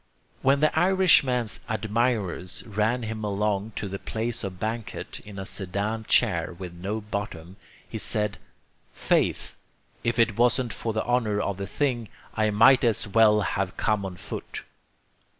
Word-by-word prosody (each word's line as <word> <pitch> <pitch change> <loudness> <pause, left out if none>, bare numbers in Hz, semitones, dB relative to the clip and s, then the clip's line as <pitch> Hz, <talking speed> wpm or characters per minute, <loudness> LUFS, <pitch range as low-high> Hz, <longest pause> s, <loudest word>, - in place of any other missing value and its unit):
When 140 +2 +3
the 155 - +3
Irishman's 165 - +4
admirers 110 -4 -1
ran 110 +3 0
him 110 0 -4
along 105 +1 -1
to 100 - -3
the 100 0 -5
place 115 +1 -3
of 95 -2 -5
banquet 110 +1 -4
in 105 -1 -11
a 95 - -5
sedan 105 +3 -3
chair 90 - +2
with 90 -2 -7
no 100 +5 -4
bottom, 100 -5 -5 0.3
he - - -5
said, 105 -2 -1 0.5
"Faith, - - 0 0.5
if 115 0 0
it 115 -3 +3
wasn't 120 -1 +2
for 115 - -2
the 110 0 -2
honor 115 -4 +1
of 100 -2 -2
the 100 0 -4
thing, 120 -2 -1 0.2
I 110 -1 +1
might 120 +6 +6
as 115 -3 +1
well 105 0 +5
have 100 -2 -2
come 105 -2 +1
on 95 -2 -5
foot." - - -6
110 Hz, 150 wpm, -26 LUFS, 100-115 Hz, 0.5 s, might